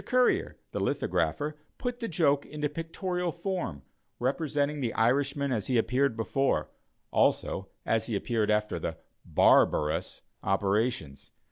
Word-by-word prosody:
Currier, 250 -1 +2 0.2
the - - -3
lithographer, 150 0 0 0.2
put 245 -1 -3
the 230 - -3
joke 145 -5 +2
into 150 0 -3
pictorial 175 +3 -3
form, 170 - -3 0.3
representing 145 +2 0
the 120 -3 -1
Irishman 140 +4 +2
as 110 -5 -1
he 125 - +2
appeared 125 +2 +2
before, 135 +4 0 0.4
also - - +1 0.2
as 110 -1 +1
he 115 - -1
appeared 110 +1 0
after 105 0 +1
the - - -4 0.3
"barbar 75 0 +4
ous" - - -4 0.2
operations. 95 - 0
140 Hz, 130 wpm, -29 LUFS, 110-155 Hz, 0.4 s, barbar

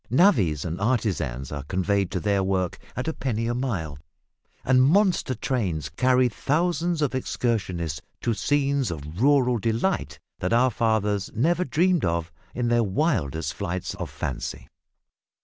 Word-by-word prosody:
Navvys 110 - +3
and 85 +2 -4
artisans 90 - -1
are 70 -1 -4
conveyed 95 +5 0
to 95 - -2
their 100 +3 +1
work 95 -2 -1 0.2
at 125 - -3
a 160 - 0
penny 115 -6 -2
a 120 - 0
mile, 95 - -3 0.7
and 130 0 +5
monster 175 -2 +3
trains 95 - -2
carry 130 0 +3
thousands 165 - 0
of 140 - 0
excursionists 95 - -2 0.2
to 120 - +1
scenes 140 +2 +1
of 80 +3 -6
rural 130 -3 +4
delight 115 - -1 0.2
that - - -1
our 125 +2 +4
fathers 105 -3 0
never 170 +10 +2
dreamed 175 +5 +2
of 85 -1 -1 0.2
in 125 -1 0
their 120 0 +3
wildest 95 - 0
flights 95 -3 -3
of - - -5
fancy. 65 -1 -5
115 Hz, 145 wpm, -25 LUFS, 90-135 Hz, 0.7 s, and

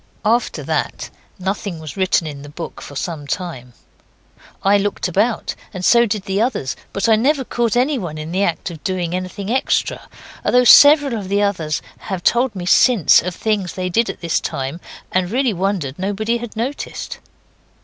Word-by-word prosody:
After 235 +3 +1
that - - -2 0.3
nothing 195 -1 -3
was 155 -2 -8
written 185 -3 +1
in 145 -2 -6
the 145 - -10
book 165 +3 -8
for 145 - -10
some 150 -1 -4
time. 140 -8 -5 0.9
I 200 +1 +4
looked 205 -1 -1
about, 210 +6 0 0.2
and 185 0 -3
so 235 0 +5
did 205 -1 -2
the 195 +1 -1
others, 220 - -1 0.2
but 200 - -1
I 225 - +6
never 270 +5 +2
caught 235 -2 0
anyone 245 - 0
in 155 +1 -6
the 185 +2 0
act 175 -2 -1
of 160 -3 -11
doing 180 -2 -2
anything 185 +3 -4
extra; 260 - 0 0.4
though 250 0 +4
several 285 +2 +8
of 190 -2 -7
the 200 +1 +2
others 165 -7 -1 0.2
have 190 -4 -5
told 240 -2 +2
me 180 -2 -5
since 200 - +5
of 180 0 -4
things 205 -4 -1
they 185 -1 -3
did 230 +6 +1
at - - -6
this 170 -2 0
time, 135 +6 -4 0.3
and 185 -1 +1
really 250 +1 +1
wondered 185 -7 -2
nobody 210 +5 -1
had 235 -1 -8
noticed. 250 +6 -4
195 Hz, 180 wpm, -19 LUFS, 170-230 Hz, 0.9 s, several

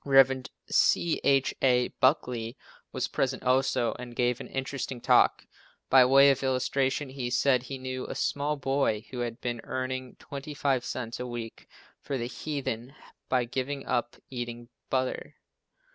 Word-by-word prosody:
Rev. 135 -1 +5 0.2
C. 170 -2 +3
H. 135 -1 +3
A. 125 -2 +3
Buckley 125 -3 +1 0.3
was - - -1
present 135 -1 -1
also 130 -2 +2
and 120 -1 -8
gave 125 0 +1
an - - -7
interesting 135 -1 -4
talk. - - +4 0.5
By 130 -1 +8
way 135 +2 +7
of 135 - -1
illustration, 135 +1 0
he 130 -2 -4
said 130 0 +3
he 135 +2 -6
knew 130 0 -5
a - - -5
small 145 +1 0
boy 135 -5 0
who 125 - -5
had 120 -1 -3
been 120 -2 -3
earning 130 0 -4
twenty 145 +1 -8
five 135 -4 +1
cents 120 -2 -4
a 125 - -4
week 120 -2 -7 0.3
for 140 - -3
the 120 - -2
heathen 130 -2 -4 0.3
by 125 -2 +2
giving 135 +3 -3
up 120 -1 -1 0.2
eating 120 -1 -5 0.2
butter. 130 -1 -2
130 Hz, 155 wpm, -28 LUFS, 120-135 Hz, 0.5 s, By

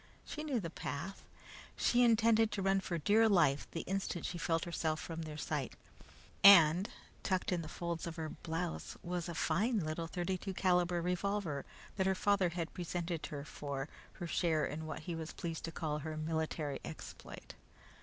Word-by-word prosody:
She 305 - -5
knew 280 -6 0
the 165 -5 -5
path. 170 +5 -5 0.5
She 245 - +3
intended 225 -1 +5
to 200 -2 -1
run 195 0 +3
for 180 -2 -2
dear 215 +8 +4
life 155 -8 +4
the 165 - -4
instant 190 -3 -2
she 175 - -3
felt 165 -2 +1
herself 160 -2 -1
from 165 -1 -5
their 155 -2 -6
sight, 150 -3 -2 0.7
and 180 -1 +9 0.3
tucked 185 -1 0
in 175 -2 +1
the 155 - -7
folds 170 -1 -3
of 165 - -5
her 160 -2 -3
blouse 165 +1 -4
was 175 -1 -3
a 170 - -4
fine 210 +11 +1
little 155 +1 -3
32 185 +2 -3
caliber 180 -2 +2
revolver 180 -4 -1 0.3
that 190 -1 +2
her 190 - +3
father 200 -2 +3
had 170 -1 -4
presented 175 -2 -3
her 145 -1 -6
for 140 -2 -4 0.3
her 175 - -6
share 165 -2 +1
in 155 +2 -4
what 155 - -5
he 170 +2 -4
was 165 -1 -5
pleased 165 -2 -4
to 165 - -5
call 150 -2 -2
her 155 +1 -5
military 155 -2 -2
exploit. - - -9
170 Hz, 175 wpm, -35 LUFS, 160-190 Hz, 0.7 s, and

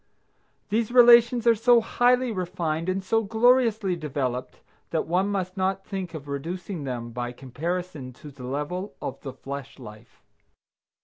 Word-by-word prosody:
These 225 +2 0
relations 240 -1 +7
are 235 - +7
so 235 +2 +5
highly 245 +2 +2
refined 175 -3 -2
and 190 +1 -1
so 225 +4 +2
gloriously 225 -3 +3
developed 130 -6 -3 0.3
that 160 - -1
one 180 +4 +1
must 190 -1 -3
not 190 +1 -1
think 185 -4 -5
of 145 -2 -8
reducing 165 +3 -5
them 120 -3 -4
by 120 +1 -4
comparison 145 +3 -5
to 145 +4 -12
the 130 -2 -10
level 150 +9 -4
of - - -6
the 135 - -6
flesh 135 +1 -8
life. 105 -5 -13
180 Hz, 145 wpm, -25 LUFS, 140-215 Hz, 0.3 s, relations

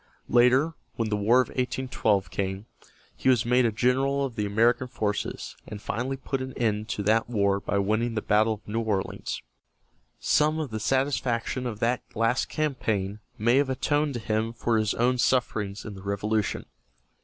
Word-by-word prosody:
Later, 125 +6 +4 0.2
when 115 -2 -1
the 105 - +1
War 110 +5 +4
of - - -4
1812 120 -7 0
came, 95 +2 -3 0.5
he - - +1
was 125 -4 +3
made 125 0 +4
a - - 0
general 135 +5 +1
of 125 -4 -6
the 105 -1 -1
American 115 +5 +2
forces, 105 -5 -3
and 105 - -7
finally 125 +5 -3
put 135 0 -3
an 130 0 -5
end 110 -2 0
to 100 - -2
that 110 +3 +2
war 100 -4 +2
by 100 - -2
winning 110 +4 0
the 110 - -1
battle 110 +2 +3
of 105 - -21
New 115 +2 -1
Orleans. 105 -4 -2 0.8
Some 155 +1 +2
of 150 -6 -3
the 110 - -3
satisfaction 130 0 0
of 110 -3 -4
that 120 +2 +1
last 115 +3 +1
campaign 110 -10 -1 0.2
may 120 +4 +3
have 140 -1 +2
atoned 145 +2 0
to - - -2
him 110 +1 -1
for 115 -1 +1
his 105 -1 0
own 125 +2 +2
sufferings 110 -5 0
in 105 - -6
the 95 - -10
Revolution. 100 +1 -1
115 Hz, 180 wpm, -27 LUFS, 105-130 Hz, 0.8 s, Later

